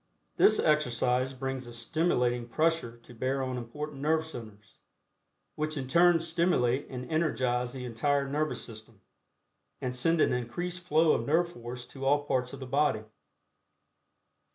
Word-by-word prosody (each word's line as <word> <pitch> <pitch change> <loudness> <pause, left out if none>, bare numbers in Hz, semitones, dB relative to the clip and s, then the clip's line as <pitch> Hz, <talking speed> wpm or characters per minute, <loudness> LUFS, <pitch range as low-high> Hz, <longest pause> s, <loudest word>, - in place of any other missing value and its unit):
This 215 - +6
exercise 130 -3 +2
brings 135 -1 -4
a 120 - -9
stimulating 120 -1 0
pressure 155 -4 0
to - - -14
bear 130 +3 -1
on 130 -1 -2
important 135 +4 -6
nerve 160 +2 +2
centers, 110 -7 -11 0.7
which 155 0 -3
in 130 -2 -3
turn 170 +4 +5
stimulate 165 -7 +1
and 125 -1 -6
energize 130 -6 0
the 130 -2 -6
entire 140 +4 0
nervous 150 +2 -1
system, 110 -2 -12 0.8
and 125 0 -3
send 165 +6 +2
an - - +4
increased 170 +10 -3
flow 160 -2 +3
of - - 0
nerve 170 +3 +2
force 120 +1 -7
to 135 +2 -10
all 145 +2 +3
parts 125 -3 -1
of 140 - -8
the 130 - -6
body. 135 -4 +1
135 Hz, 150 wpm, -29 LUFS, 125-155 Hz, 0.8 s, This